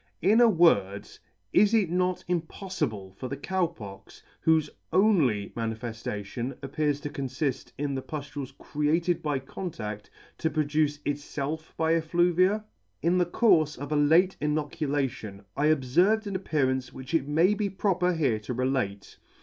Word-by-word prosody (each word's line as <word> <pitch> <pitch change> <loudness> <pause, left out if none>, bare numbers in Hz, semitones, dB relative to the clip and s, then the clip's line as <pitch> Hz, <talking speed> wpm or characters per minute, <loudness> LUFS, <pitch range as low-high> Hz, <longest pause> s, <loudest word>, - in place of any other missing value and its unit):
In 215 +6 +5
a 235 - +7
word, 100 - +3 0.5
is 210 +3 +5
it 195 -7 +2
not 180 0 0
impoffible 160 - -3
for 130 - -4
the 140 - -5
Cow 185 +4 0
Pox, 100 - -12 0.2
whofe 160 -2 +3 0.2
only 155 - +3
man 115 -1 -1
i - - -7
foliation 115 +1 -5
appears 145 +1 -1
to 145 - -4
confift 135 0 -3
in 145 0 -2
the 135 - -2
puflules 145 -2 -6
created 165 +4 0
by 150 -2 0
contaEl, 115 - -6 0.4
to 160 - +1
produce 150 -1 +1
itfelf 145 +2 -4
by 160 0 +2
effluvia? 175 +5 +2 0.4
In 175 +2 +3
the 175 - +2
courfe 160 -7 +3
of 145 +3 -7
a - - +2
late 165 +6 +4
inoculation, 145 -8 -2
I 145 +2 +2
obferved 175 - +3
an 200 -1 -4
appearance 130 -8 0
which 130 +4 -9
it 150 -4 +1
may 165 +7 +3
be 210 -1 -1
proper 180 -2 +1
here 135 -9 +1
to 115 +4 -5
relate. 125 -6 -2
150 Hz, 150 wpm, -27 LUFS, 130-175 Hz, 0.5 s, a